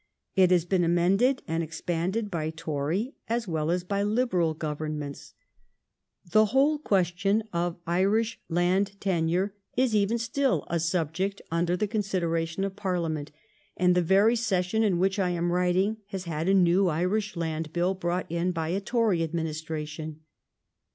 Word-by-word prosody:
It 185 -2 +5
has 175 -2 +3
been 180 0 +1
amended 190 +10 +2
and 165 +1 -1
expanded 175 +6 -2
by 160 -3 -2
Tory 160 - -2
as 230 -1 -1
well 160 -2 -1
as 175 +1 0
by 200 +2 -1
Liberal 205 -7 +1
gov 155 -1 -3
ernments. 150 -2 -5 1.0
The 215 +3 +6
whole 275 +7 +2
question 195 - +1
of 170 0 -1
Irish 200 +6 +1
land 185 +4 +1
tenure 180 +1 0 0.2
is 255 -2 +2
even 210 +3 +2
still 245 +4 0
a 170 - +1
subject 170 +4 -1
under 170 +2 +1
the 210 - 0
consideration 180 -5 -1
of 195 -1 -3
Parliament, 170 -7 -2 0.5
and 180 0 +4
the 180 - +3
very 195 +7 +4
session 220 -2 0
in 200 -5 +2
which 190 +3 +1
I 185 -2 +2
am 175 0 0
writing 180 +4 +1
has 195 -3 -5
had 165 0 -2
a - - +4
new 185 +1 +4
Irish 185 +6 0
land 160 -2 -3
bill 175 +3 +1
brought 180 -1 -2
in 170 +2 0
by 165 -2 -2
a 190 +4 -1
Tory 225 -5 +1
administration. 155 -1 -4
180 Hz, 155 wpm, -27 LUFS, 165-200 Hz, 1.0 s, The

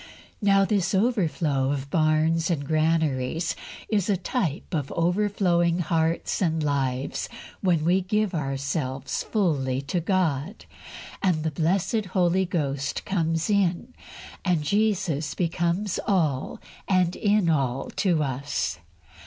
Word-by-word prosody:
Now, 195 -1 +4
this 195 -2 +1
overflow 170 - +1
of 140 0 -4
barns 160 +1 +2
and 150 -5 -1
granaries 155 -1 0 0.3
is 205 -3 0
a 200 - +3
type 180 - -2
of 145 -4 -2
overflowing 175 -1 +2
hearts 165 +1 0
and 160 -3 +1
lives 135 -2 -1 0.3
when 170 -5 +1
we 180 +3 +3
give 210 +2 0
ourselves 135 -2 -2
fully 140 - 0
to 175 +6 -1
God, 170 0 -1 0.6
and 175 -5 +1
the 160 - -1
blessed 185 +8 0
Holy 185 0 +3
Ghost 140 -5 -2
comes 165 -3 0
in, 200 +3 +1 0.5
and 175 -5 +1
Jesus 190 -5 0
becomes 175 +3 0
all 155 -10 0 0.3
and 180 -2 +2
in 205 -3 +2
all 135 -5 0
to 175 -6 +2
us. 135 - -2
165 Hz, 120 wpm, -25 LUFS, 145-190 Hz, 0.6 s, Now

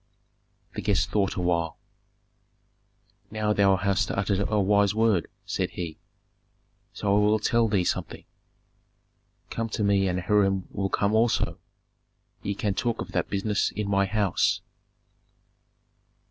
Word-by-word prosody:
The - - -4
guest 90 -4 +1
thought 100 -1 +1
awhile. 85 -3 0 1.5
"Now 105 0 0
thou 100 -2 +4
hast 100 +1 0
uttered 100 0 0
a 105 - +2
wise 100 +1 +3
word," 110 -7 +2 0.2
said - - -2
he; 85 -3 -6 0.9
"so 100 -1 0
I - - +4
will 105 +1 +3
tell 115 +2 +2
thee 100 -4 +1
something. - - -3 1.3
Come 115 0 -2
to 110 0 -2
me 100 -1 +3
and 90 0 -1
Hiram 95 -1 +1
will 95 0 -2
come 100 +2 +1
also; 115 +1 +1 0.8
ye 100 - -3
can 100 0 -1
talk 115 +3 -1
of - - -5
that - - -1
business 100 +1 0
in 105 -1 -4
my 100 0 +2
house." 100 -3 +1
100 Hz, 130 wpm, -26 LUFS, 95-105 Hz, 1.5 s, thou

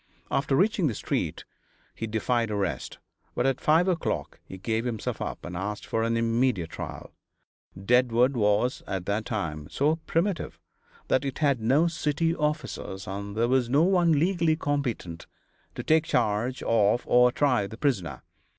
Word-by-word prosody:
After 135 0 +1
reaching 195 +1 +2
the 115 - -2
street - - -3 0.5
he 115 - -5
defied 115 +1 0
arrest, 100 -4 -3 0.4
but 125 - 0
at 135 -1 +1
five 160 +4 +4
o'clock 175 -3 -2
he 95 - -10
gave 110 +4 -1
himself 120 -4 -3
up - - -5
and 90 - -6
asked 105 +4 -4
for 115 - -1
an 115 0 +1
immediate 115 -6 +1
trial. - - -7 0.7
Deadwood 125 +4 +3
was, 105 +3 +1
at 95 -2 -3
that 105 +2 -1
time, 80 - -4
so 150 - +1
primitive 170 +2 -1 0.5
that 130 - +2
it 135 -2 -4
had 140 -6 +1
no 135 +9 +3
city 165 0 0
officers, 150 - -3
and 100 +2 -5
there 115 +1 +2
was 125 -1 +2
no 140 +5 +4
one 175 -2 +3
legally 165 +1 +2
competent 130 - -3 0.5
to - - -5
take 160 0 +3
charge 120 -2 0
of 115 +1 +2
or 125 0 +5
try 125 -7 +1
the 110 - -10
prisoner. 120 - -1
125 Hz, 160 wpm, -27 LUFS, 105-150 Hz, 0.7 s, or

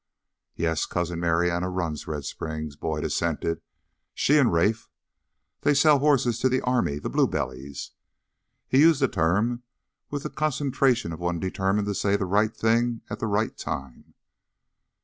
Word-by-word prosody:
"Yes, 80 -2 0
Cousin 85 -1 -2
Marianna 85 +1 +1
runs 85 -5 -3
Red 75 -3 -4
Springs," 80 -2 -5
Boyd 75 +1 -3
assented, 85 0 -1 0.5
"she 150 +2 +4
and 130 -5 +4
Rafe. 105 +7 +1 0.7
They 145 0 +3
sell 145 0 +5
horses 130 -5 +2
to 130 - +3
the 130 0 +1
army 125 - +1
the - - -5
blue - - +2
bellies." 65 +2 -5 0.8
He 130 - +3
used 160 -1 +6
the - - +5
term 105 +8 +1 0.5
with 145 -1 -4
the - - -5
concentration 135 - +1
of 80 - -8
one 85 -1 -1
determined 95 +3 0
to 100 - -1
say 100 +1 +1
the 100 - -2
right 105 +4 +1
thing 115 +1 +1
at - - -4
the 115 - -2
right 105 +2 0
time. 65 -2 -7
100 Hz, 155 wpm, -26 LUFS, 80-125 Hz, 0.8 s, used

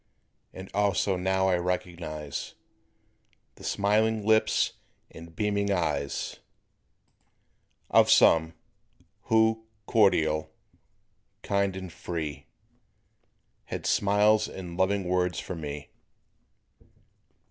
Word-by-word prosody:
And 95 +1 -9
also 100 -1 +1
now 95 +1 +1
I 90 -1 +2
recognize 85 -4 -4 1.0
The - - -16
smiling 110 +1 +1
lips 110 0 +3 0.4
and 85 0 -12
beaming 100 0 0
eyes 80 -6 -2 1.5
Of - - +5
some, 80 0 +5 0.7
who, 110 0 +2 0.2
cordial, 80 -9 +2 0.9
kind 100 -1 0
and 95 -3 -7
free, 80 -3 -5 1.2
Had - - -6
smiles 105 +2 +3
and 90 -2 -8
loving 95 +2 +1
words 90 0 0
for - - -6
me. 75 -4 -7
95 Hz, 85 wpm, -27 LUFS, 85-100 Hz, 1.5 s, Of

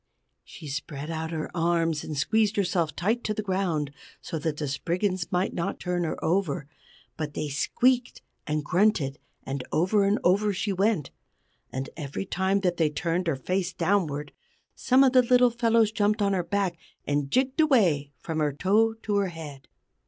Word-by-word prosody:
She 160 - -11
spread 145 +2 -5
out 160 0 -3
her 160 -2 -4
arms 165 -2 +1
and 150 - -5
squeezed 215 +7 +2
herself 175 -6 0
tight 220 +7 0
to 215 - -1
the 215 - -3
ground, 180 -7 -1 0.3
so 160 - -5
that 150 0 -2
the 150 - -2
Spriggans 180 +7 -1
might 180 +1 0
not 170 - -3
turn 180 -1 -1
her 160 - -3
over; 165 -4 0 0.5
but 150 -2 -4
they 150 - -2
squeaked 245 - +1 0.2
and 150 0 -1
grunted, 175 -5 +1 0.2
and 135 -1 -4
over 190 +5 +2
and 200 +2 +3
over 200 +3 +3
she 195 +1 -1
went. 195 -5 +1 0.6
And 130 0 -4
every 150 +4 -5
time 190 +2 0
that 180 -2 0
they 160 -2 +3
turned 170 +4 -1
her 160 - +1
face 180 +7 -2
downward, 150 -7 0 0.4
some 260 +1 +4
of 265 -1 +4
the 255 - +7
little 250 0 +4
fellows 230 -2 +3
jumped 210 -1 +1
on 200 0 +2
her 180 -2 0
back, 190 -3 -1 0.3
and 145 -1 0
jigged 260 - +2
away 180 - +3
from 160 -1 -4
her 150 -2 +1
toe 215 +8 +2
to 205 -1 0
her 200 -1 +2
head. 155 -6 -9
180 Hz, 175 wpm, -27 LUFS, 150-205 Hz, 0.6 s, the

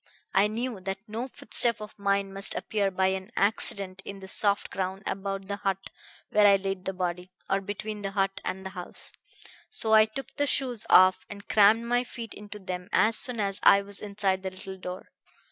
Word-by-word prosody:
I 195 +2 +5
knew 230 0 -3
that 195 +3 -6
no 225 +4 -4
footstep 235 -3 +2
of 210 0 -10
mine 200 -1 0
must 195 +1 -2
appear 205 -2 0
by 190 0 +1
any 190 +1 -4
accident 195 -2 +1
in 200 0 -7
the 190 - -10
soft 200 +1 +2
ground 190 +1 -3
about 195 0 -3
the 200 - -3
hut 195 -1 -3 0.4
where 210 0 +6
I 200 - +7
laid 195 -1 -3
the 190 - -2
body, 180 0 -3 0.2
or 195 0 +1
between 210 +2 -5
the 195 - -2
hut 195 -1 -1
and 190 0 -4
the 190 - -5
house, 180 -2 -5 0.6
so 225 - +2
I 215 0 +8
took 230 +6 -8
the 290 -1 +1
shoes 250 -5 -1
off 185 0 +6
and 200 -1 -10
crammed 215 +2 +5
my 245 +1 +2
feet 235 -3 -8
into 210 0 -10
them 180 -2 -6
as 225 +1 +4
soon 245 -1 0
as 195 -1 -1
I 200 0 +6
was 200 0 -5
inside 200 -2 -1
the 190 - -3
little 190 0 -8
door. 180 0 -7
200 Hz, 200 wpm, -28 LUFS, 190-215 Hz, 0.6 s, I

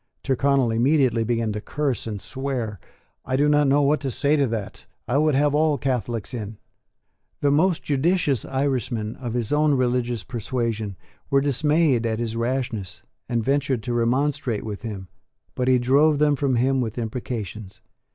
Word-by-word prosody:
Tyrconnel 135 -2 +2
immediately 125 -1 +2
began 115 -1 0
to 105 - -4
curse 140 -1 -2
and 105 -2 -4
swear. 125 -5 -4 0.4
"I 130 - -2
do 145 +2 +3
not 150 -1 +4
know 145 +2 +4
what 150 +2 +3
to 135 -1 -3
say 145 +4 +1
to 140 -3 +2
that; 110 -4 -5 0.2
I 130 +4 +2
would 155 -2 +3
have 145 +1 +3
all 150 0 +2
Catholics 120 -3 -2
in." 110 -3 -5 0.8
The 145 - +3
most 165 +4 +2
judicious 145 - +1
Irishmen 125 -5 -2
of 120 -4 -5
his 120 +1 -1
own 150 -1 +3
religious 120 -3 0
persuasion 115 -2 -3 0.3
were 140 - +4
dismayed 145 -2 +2
at 110 -1 -1
his 115 -1 -3
rashness, 115 -5 -3 0.3
and 115 -2 0
ventured 135 -2 0
to 120 - -2
remonstrate 120 -1 0
with 105 -2 -6
him; 100 -5 -6 0.5
but 125 - -2
he 130 -1 +5
drove 140 +5 +3
them 150 0 +3
from 135 -2 0
him 130 +2 +2
with 115 -2 -4
imprecations. 110 -4 -5
125 Hz, 165 wpm, -23 LUFS, 115-140 Hz, 0.8 s, he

